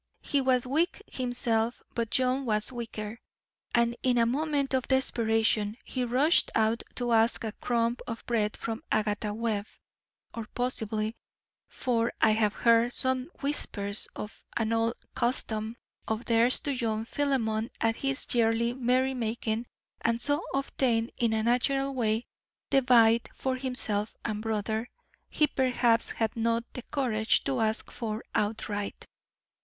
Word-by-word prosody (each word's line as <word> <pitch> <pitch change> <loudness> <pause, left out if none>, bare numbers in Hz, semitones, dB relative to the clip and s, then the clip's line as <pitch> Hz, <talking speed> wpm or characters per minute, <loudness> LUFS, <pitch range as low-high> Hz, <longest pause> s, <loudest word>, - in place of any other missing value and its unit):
He 280 - +1
was 255 -2 +2
weak 310 +7 0
himself, 240 -2 0
but 230 -2 -1
John 255 +2 +1
was 215 -1 +1
weaker, 230 -2 -6 0.6
and 235 0 +3
in 250 -1 +2
a 230 - +4
moment 280 +2 0
of 260 -1 0
desperation 225 -4 +2
he 255 - -2
rushed 260 +7 +3
out 220 +1 +2
to 245 -1 -1
ask 225 +1 +3
a 220 - -2
crumb 235 +2 0
of 230 -1 -6
bread 215 -3 0
from 225 0 -4
Agatha 210 -1 0
Webb, 215 -1 -2 0.7
or 230 -2 -6
possibly 220 -3 -2 0.5
for 235 -2 0
I 220 - +5
have 215 -1 +2
heard 235 +1 +4
some 260 +1 0
whispers 210 -8 0
of 210 - -8
an 225 -1 0
old 230 0 +1 0.2
custom 225 -2 -1 0.3
of 220 +2 -2
theirs 235 +2 +4
to 285 - -1
join 225 -3 -1
Philemon 230 -5 0
at 225 0 +1
his 275 0 -1
yearly 235 0 +2
merry 255 +1 +1
making 230 -1 -2 0.4
and 230 0 +1
so 290 +5 +1
obtain 250 -4 0
in 235 -2 +2
a 220 0 +1
natural 270 +4 +1
way 225 -2 0 0.5
the 270 - +5
bite 235 -2 +5
for 260 -1 -1
himself 245 -5 0
and 215 -2 -2
brother 220 +1 -2 0.4
he 305 - +3
perhaps 250 -4 +2
had 225 -2 -1
not 230 0 +1
the 250 - -5
courage 230 -6 +1
to 265 -2 -1
ask 220 0 0
for 220 -1 -4
outright. 205 -1 -2
230 Hz, 145 wpm, -29 LUFS, 220-255 Hz, 0.7 s, I